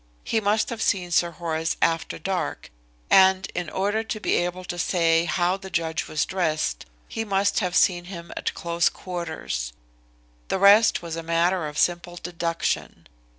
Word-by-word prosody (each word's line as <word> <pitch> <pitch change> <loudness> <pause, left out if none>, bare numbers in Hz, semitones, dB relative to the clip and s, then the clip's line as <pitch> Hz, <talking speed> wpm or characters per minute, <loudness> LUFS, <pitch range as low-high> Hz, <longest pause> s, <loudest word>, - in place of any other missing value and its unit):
He 220 - 0
must 215 +3 +1
have 230 -1 -5
seen 180 -3 0
Sir 170 0 +3
Horace 165 -1 -2
after 165 -1 0
dark, 185 +2 -3 0.4
and 190 0 +6
in 175 -2 -3
order 205 +3 0
to 220 - -4
be - - 0
able 175 +1 -1
to 175 -1 -5
say 165 -1 +2
how 175 +2 +1
the 190 0 -10
judge 165 -2 -2
was 155 -1 0
dressed 155 - -1 0.2
he 225 - -3
must 200 -1 +1
have 180 -4 -2
seen 175 -2 +3
him 170 -2 -9
at - - -3
close 170 0 +1
quarters. 170 - -5 0.7
The - - 0
rest 200 +1 +6
was 165 -1 -5
a 165 - -4
matter 170 +1 +1
of 150 0 -8
simple 175 +1 0
deduction. 170 -1 -3
175 Hz, 165 wpm, -24 LUFS, 165-190 Hz, 0.7 s, and